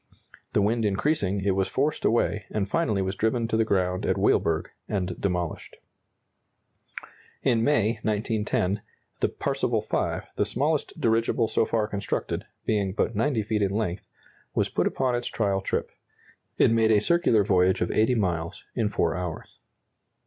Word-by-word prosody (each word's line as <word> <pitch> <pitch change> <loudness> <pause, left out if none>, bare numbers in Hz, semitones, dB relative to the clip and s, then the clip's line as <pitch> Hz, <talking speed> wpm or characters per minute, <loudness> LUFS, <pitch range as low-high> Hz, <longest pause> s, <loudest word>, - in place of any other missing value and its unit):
The 105 - +3
wind 115 +3 +1
increasing, 100 -2 0
it 100 - +3
was 95 -1 +1
forced 145 +3 -1
away, 110 -2 +1
and 105 -2 -1
finally 105 -7 0
was 95 +1 -2
driven 115 +3 0
to 110 - 0
the 110 - +3
ground 90 -4 0
at - - +1
Weilburg 80 -1 +1 0.2
and 95 -3 -1
demolished. 90 -4 -2 1.7
In 115 -3 +2
May, 115 -5 +2
1910, 105 -2 0 0.4
the - - +2
"Parseval - - -1
V," - - -1
the - - +3
smallest 145 +3 -1
dirigible 115 0 +2
so 110 - +1
far 110 -2 +1
constructed, 100 -2 -3 0.2
being 100 -3 0
but 110 +1 -1
90 115 0 +1
feet 105 0 -1
in 100 -1 +1
length, 105 -4 -2 0.5
was - - +1
put - - +1
upon 130 -1 0
its 120 0 -1
trial 100 -3 0
trip. - - -2 0.7
It - - +5
made 115 -1 +3
a 110 -2 +5
circular 120 - +3
voyage 95 -1 +3
of - - 0
80 110 +4 +3
miles 85 -6 -2
in 110 -4 0
4 85 -5 0
hours. 90 -2 -6
105 Hz, 155 wpm, -26 LUFS, 95-115 Hz, 1.7 s, It